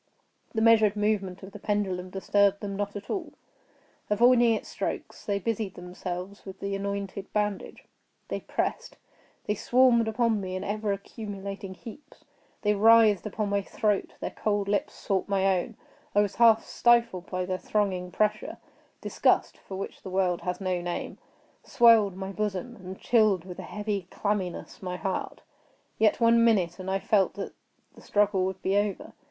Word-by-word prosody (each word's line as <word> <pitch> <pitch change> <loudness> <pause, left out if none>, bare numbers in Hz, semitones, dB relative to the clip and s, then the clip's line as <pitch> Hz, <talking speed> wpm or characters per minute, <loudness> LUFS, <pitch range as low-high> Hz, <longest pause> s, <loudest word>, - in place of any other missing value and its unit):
The 220 - +1
measured 220 -2 +5
movement 205 -3 -1
of 195 - -9
the 210 - -10
pendulum 190 -3 -1
disturbed 200 +1 +2
them 200 -2 -4
not 205 0 -3
at 200 0 -7
all. 365 -5 -4 0.8
Avoiding 235 +2 +5
its - - -6
strokes - - -5
they 200 -1 +1
busied 215 -1 -3
themselves 180 +2 -6
with 190 -1 -10
the 200 0 -3
anointed 200 0 -4
bandage. 210 -2 -2 0.4
They - - -3
pressed—they 210 - -5
swarmed 240 +1 +3
upon 220 -1 +1
me 185 -1 -4
in 185 - -4
ever 210 0 -2
accumulating 200 -1 -6
heaps. 235 +8 -13 0.4
They 210 -1 +3
writhed 215 -1 +5
upon 210 0 -2
my 200 0 +1
throat; 210 0 -1
their - - -3
cold 205 -2 -1
lips 205 0 -1
sought 195 0 -2
my 195 -1 +2
own; 215 +5 -7 0.4
I 205 - +6
was 205 -1 -2
half 225 -2 +5
stifled 235 -6 +2
by 185 -1 -2
their 185 0 -3
thronging 190 -4 -1
pressure; 210 +2 -1 0.4
disgust, - - +1
for 190 - -9
which 195 - -6
the - - -8
world 185 -2 0
has 180 0 -3
no 185 -2 -1
name, 175 0 -5 0.4
swelled 225 -6 +5
my 190 0 -5
bosom, 210 +3 -3
and 190 -2 -9
chilled, 215 -7 +3
with 180 -2 -9
a - - -8
heavy 205 -3 -3
clamminess, 200 -4 -3
my 180 -1 -4
heart. 190 0 -4 0.6
Yet 215 -2 +3
one 230 0 +5
minute, 190 -6 +2
and 185 0 -5
I 190 - +1
felt 195 -1 +1
that 200 - -6 0.4
the - - -16
struggle 205 -2 +2
would 190 0 -4
be 195 - +1
over. 205 -1 -1
200 Hz, 165 wpm, -27 LUFS, 190-215 Hz, 0.8 s, I